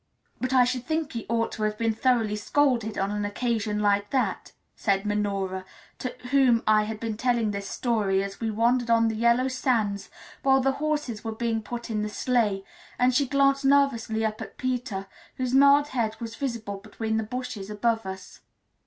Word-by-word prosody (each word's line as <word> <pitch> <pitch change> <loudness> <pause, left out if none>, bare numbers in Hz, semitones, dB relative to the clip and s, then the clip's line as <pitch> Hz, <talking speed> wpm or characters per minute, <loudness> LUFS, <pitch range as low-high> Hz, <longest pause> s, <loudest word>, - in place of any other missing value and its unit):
"But 255 0 -2
I 255 -1 +6
should 250 0 -1
think 315 0 -2
he 230 -2 -5
ought 230 0 0
to - - -7
have 210 0 0
been 225 0 +1
thoroughly 225 -2 +1
scolded 235 -1 +1
on 195 +1 0
an 210 0 -2
occasion 215 0 -1
like 205 -1 +1
that," 260 -2 -1 0.2
said 195 -1 0
Minora, 200 -2 -1 0.4
to 255 - -4 0.2
whom 260 -4 +4
I 215 0 +4
had 215 0 -5
been 225 -2 -3
telling 235 -3 +1
this 200 -1 -5
story 205 -5 0
as 195 0 -7
we 225 - -1
wandered 235 +2 +1
on 230 -1 +4
the 220 - -3
yellow 235 +3 +3
sands 230 -6 0 0.3
while 270 0 +4
the 270 +1 +2
horses 295 -8 -2
were 225 -1 -3
being 225 -1 -1
put 235 +2 -6
in 215 -1 -1
the 210 - -2
sleigh; 210 -4 0 0.3
and 250 +1 +3
she 275 +2 +2
glanced 275 +1 +3
nervously 270 -6 +2
up 215 0 -3
at - - -8
Peter, 245 -6 -2 0.3
whose 255 -1 -2
mild 280 +2 +6
head 225 -4 -2
was 230 -1 -6
visible 230 -6 -4
between 220 +2 -3
the 220 - 0
bushes 215 -3 -5
above 225 0 0
us. 190 0 -8
230 Hz, 190 wpm, -26 LUFS, 210-255 Hz, 0.4 s, I